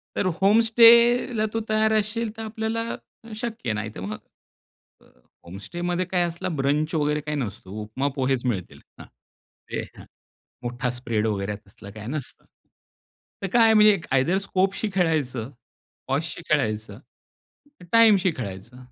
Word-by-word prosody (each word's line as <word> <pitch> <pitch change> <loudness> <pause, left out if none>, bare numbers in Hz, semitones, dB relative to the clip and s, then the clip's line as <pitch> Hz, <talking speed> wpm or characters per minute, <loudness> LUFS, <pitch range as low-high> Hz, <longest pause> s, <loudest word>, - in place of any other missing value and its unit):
तर - - 0 0.2
होमस्टेला 230 +2 +5
तू 225 - 0
तयार 220 0 +2
असशील, 215 +2 0
तर - - -5
आपल्याला 220 +1 -3 0.5
शक्य 220 - -3
नाही, 110 +1 -3
तर - - -7
मग 105 +3 -5 0.8
अ, - - -23 0.4
होमस्टेमध्ये 175 - -3
काय 180 -1 +1
असलं 170 0 -3
ब्रंच 150 +4 0
वगैरे 150 0 +1
काही 150 0 -3
नसतं 100 -7 -5
उपमा, 110 +7 -2
पोहेच 130 -2 0
मिळतील. 95 -8 -3 0.2
हां. - - -10 0.7
ते - - -2 0.2
हां, - - -12 0.6
मोठा 120 +1 -2
स्प्रेड 115 -3 -1
वगैरे 100 -1 -2
तसलं 100 +1 -13
काही 105 +1 -9
नसतं. 140 0 -6 1.0
तर - - 0
काय 225 -2 +6
म्हणजे 210 -3 +6
आयदर 135 +8 +2
स्कोपशी 195 +3 0
खेळायचं, 145 - 0 0.6
पॉझशी 150 +5 -2
खेळायचं, 110 -8 -1 0.9
टाईमशी 210 -5 +6
खेळायचं. 105 +1 -7
155 Hz, 130 wpm, -24 LUFS, -, 1.0 s, काय